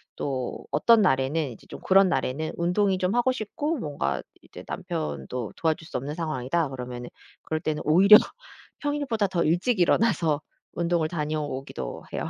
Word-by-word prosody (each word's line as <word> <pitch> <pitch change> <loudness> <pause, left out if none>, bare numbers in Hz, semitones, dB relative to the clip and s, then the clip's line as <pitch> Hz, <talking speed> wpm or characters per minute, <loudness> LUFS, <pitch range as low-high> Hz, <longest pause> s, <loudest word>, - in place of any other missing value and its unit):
또 130 -3 -4
어떤 230 -2 +5
날에는 140 -3 +1
이제 115 - -14
좀 - - -9
그런 195 0 +5
날에는 150 +1 -1
'운동이 185 +3 +1
좀 185 +4 0
하고 245 +2 +3
싶고 285 +7 -3
뭔가 70 - -2 0.2
이제 - - -12
남편도 75 - -4
도와줄 160 +1 -1
수 - - -4
없는 140 +4 -5
상황이다.' 155 -1 -1
그러면은 125 -2 -7 0.3
그럴 155 0 -3
때는 155 -1 -2
오히려 190 +7 +8 0.6
평일보다 285 -8 -1
더 180 -3 0
일찍 180 +9 +1
일어나서 175 -5 +2 0.3
운동을 170 -1 0
다녀오기도 150 -4 -4
해요. - - -3
160 Hz, 345 characters per minute, -26 LUFS, 135-195 Hz, 0.6 s, 오히려